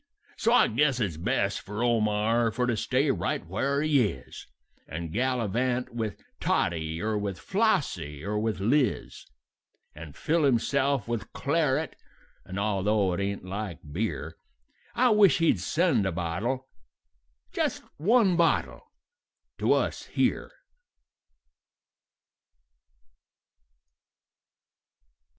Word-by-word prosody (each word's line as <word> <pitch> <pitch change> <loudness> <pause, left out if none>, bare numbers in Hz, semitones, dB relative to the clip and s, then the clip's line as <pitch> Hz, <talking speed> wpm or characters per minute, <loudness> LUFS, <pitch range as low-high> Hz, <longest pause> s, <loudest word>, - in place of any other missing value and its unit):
"So - - +1
I - - +6
guess 135 +2 +1
it's 95 -9 -1
best 100 +1 0
for 105 +3 -4
Omar 115 0 +2
for 125 +2 -1
to 120 -2 0
stay 135 +6 +1
right 90 -3 -2
where 140 - -1
he 150 -3 +3
is, 65 -6 -10 0.4
And 80 +1 -6
gallivant 125 +1 0
with 110 -3 -3 0.2
Tottie, 80 -1 0
or 110 +2 -1
with 100 -3 -3
Flossie, 95 - -1
or 105 +1 -1
with 110 -2 -1
Liz; 125 +7 0 0.7
And 75 -1 -10
fill 165 +1 +1
himself 135 -1 +1
with 120 -2 -4
claret, 150 0 0 0.5
and, 95 +1 -7
although 100 -1 +1
it 85 - -3
ain't 100 -1 -3
like 95 -3 -5
beer, 85 -4 -3 0.6
I 245 0 +4
wish 205 -8 +5
he'd 165 -1 +2
send 165 - +1
a - - -1
bottle 95 +11 -2 0.8
just - - -1
one 200 +2 +3
bottle 170 -1 +1 0.8
to - - +3
us - - -1
here." - - 0
115 Hz, 110 wpm, -27 LUFS, 95-140 Hz, 0.8 s, I